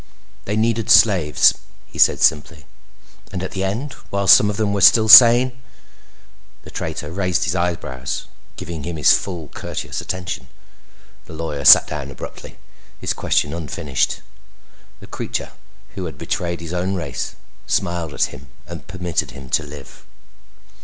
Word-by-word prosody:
"They 105 - -3
needed 115 0 0
slaves," 90 -9 +5 0.3
he - - -13
said - - +4
simply. 75 -1 0 0.7
"And 95 -2 -5
at 95 - -5
the 95 - -4
end, 115 +9 -4 0.2
while 100 0 -2
some 105 - +7
of 105 - -4
them 105 -2 -1
were 100 - -2
still 110 +3 +6
sane?" 120 +3 +8 1.1
The - - -13
traitor 75 - -5
raised 90 -1 -1
his 90 - -2
eyebrows, 85 -8 -3 0.3
giving 85 -2 -7
him 85 +1 -5
his 75 - +5
full 85 -6 -3
courteous - - -6
attention. 90 -9 -6 0.8
The - - -12
lawyer 80 -3 -5
sat - - +9
down 70 -3 -6
abruptly, 70 - -10 0.4
his - - -2
question 75 - -1
unfinished. 80 -4 -3 0.8
The - - -11
creature - - -5 0.4
who 95 - -7
had 80 - -8
betrayed 85 -1 -4
his 85 +1 -7
own 90 +2 -2
race 85 -3 -5 0.3
smiled 85 -5 -2
at - - -1
him 70 +2 -12 0.2
and 85 0 -10
permitted 90 -2 -3
him 65 -1 -11
to - - +2
live. 75 -2 -12
90 Hz, 150 wpm, -19 LUFS, 80-100 Hz, 1.1 s, sat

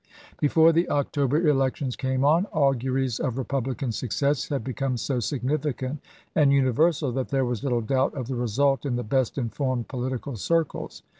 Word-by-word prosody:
Before 160 +2 +5
the 170 +2 +1
October 145 +2 +1
elections 135 -2 +1
came 130 +1 0
on, 165 +7 +4
auguries 135 - 0
of 125 -1 -2
Republican 135 -1 -2
success 125 +6 -1
had 140 -5 -2
become 130 0 -2
so 130 +1 -1
significant 140 +1 -2 0.3
and 145 -3 +4
universal 140 +2 +2
that 130 +1 -3
there 135 -1 +1
was 120 -3 -2
little 125 -4 +1
doubt 130 +4 0
of 130 -4 -4
the 135 - -3
result 130 +3 +1
in 135 -4 -1
the 120 - -2
best 130 +4 0
informed 130 -1 -2
political 130 0 -4
circles. 165 - -1
135 Hz, 160 wpm, -25 LUFS, 125-145 Hz, 0.3 s, Before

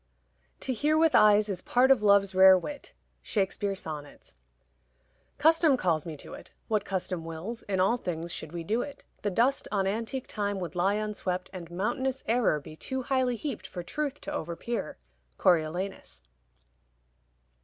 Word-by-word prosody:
To 260 - -1
hear 300 +6 +2
with 320 -1 +4
eyes 210 0 +6
is 190 -3 -3
part 255 +2 +3
of 260 -5 +5
love's 200 -1 +4
rare 190 0 +8
wit. 285 +10 -7 0.3
SHAKESPEARE: 200 -1 -1
Sonnets. 150 -5 -8 1.0
Custom 320 -3 +4
calls 170 -7 0
me 155 -2 -6
to't; - - -10 0.2
What 210 -2 0
custom 185 -3 -3
wills, 165 +8 -6
in 190 -2 0
all 195 +6 +3
things 170 -5 -4
should 155 - -5
we 170 -1 -5
do't. 240 - -3 0.2
The 205 - 0
dust 240 +8 +1
on 195 -2 +1
antique 230 +6 -2
time 205 -1 -2
would 180 -2 -5
lie 190 +3 +2
unswept, 205 -4 -3
And 175 -3 -8
mountainous 245 +9 -2
error 225 -9 +2
be 150 +2 -11
too 260 +10 -4
highly 255 -1 +1
heaped 265 0 -5
For 175 - -7
truth 290 +9 -3
to 295 - -5
over 170 - -3
peer. 235 +6 -4 0.4
_Coriolanus. 175 - 0
200 Hz, 155 wpm, -28 LUFS, 180-245 Hz, 1.0 s, rare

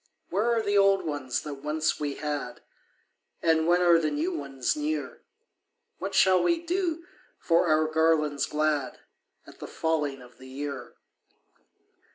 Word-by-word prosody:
Where 210 +6 +1
are 225 - 0
the 205 -1 +2
old 195 -2 +3
ones 145 -5 -2
that 145 -2 -7
once 155 +1 -1
we 145 -2 -3
had, 145 -5 -4 0.8
And 160 -1 +3
when 175 +1 +4
are 170 -1 +6
the 155 -2 0
new 150 +5 -2
ones 135 - -2
near? 305 +1 -3 0.8
What 195 0 -4
shall 185 -2 +5
we 340 - +2
do 340 -1 -2 0.3
for 170 +1 +2
our 155 0 +3
garlands 155 -3 +1
glad 150 -4 -1 0.5
At - - -16
the - - -7
falling 150 -5 -2
of 125 0 -18
the 130 - -12
year?" 135 -1 -6
155 Hz, 150 wpm, -27 LUFS, 145-190 Hz, 0.8 s, are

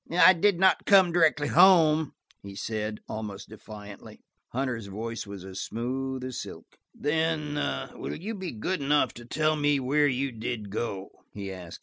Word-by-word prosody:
"I 180 +2 +7
did 185 +1 +2
not 190 0 +3
come 190 -4 +6
directly 155 -4 +3
home," 160 -5 +5 0.3
he 100 0 -10
said, 105 0 -4
almost 105 -2 -6
defiantly. 105 -1 -11 0.2
Hunter's 120 -4 -3
voice 110 +2 -5
was 100 -2 -8
as 95 0 -7
smooth 130 +4 -3
as 130 -1 -4
silk. - - -11 0.2
"Then–will 150 -1 -2
you 205 +8 -5
be 190 -4 -5
good 145 +9 -3
enough 140 -2 +2
to 120 - -11
tell 155 +5 +1
me 145 -1 +2
where 145 +3 +2
you 135 0 -1
did 110 -2 -5
go?" 100 -3 -4 0.2
he 100 -2 -5
asked. 90 -2 -9
130 Hz, 155 wpm, -27 LUFS, 110-155 Hz, 0.3 s, I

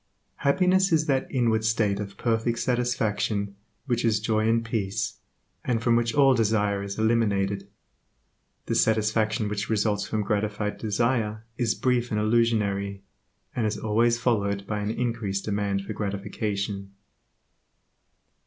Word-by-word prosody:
Happiness 185 +6 +3
is 160 -1 +3
that 135 -4 0
inward 115 -4 +1
state 110 -2 +1
of 100 -1 -6
perfect 115 0 0
satisfaction 110 -5 0 0.3
which 120 -3 0
is 110 -2 +2
joy 110 0 +1
and 115 0 +2
peace, 110 -2 -2 0.4
and 120 -3 0
from 120 -1 +4
which 115 0 +1
all 135 -2 +6
desire 105 -3 +1
is 100 0 -5
eliminated. 100 -3 +1 1.0
The - - -2
satisfaction 110 0 +2
which 105 -1 -3
results 105 -2 +1
from 110 -1 -1
gratified 105 0 -1
desire 110 0 0
is 120 -4 0
brief 125 -1 +1
and 105 - 0
illusionary, 105 -3 +1 0.5
and 115 -4 +1
is 105 - -2
always 115 +2 +2
followed 100 -5 0
by 105 +1 -2
an 105 0 -2
increased 115 -4 -2
demand 100 -1 -1
for 110 - -4
gratification. 100 -1 -3
110 Hz, 135 wpm, -26 LUFS, 100-115 Hz, 1.0 s, all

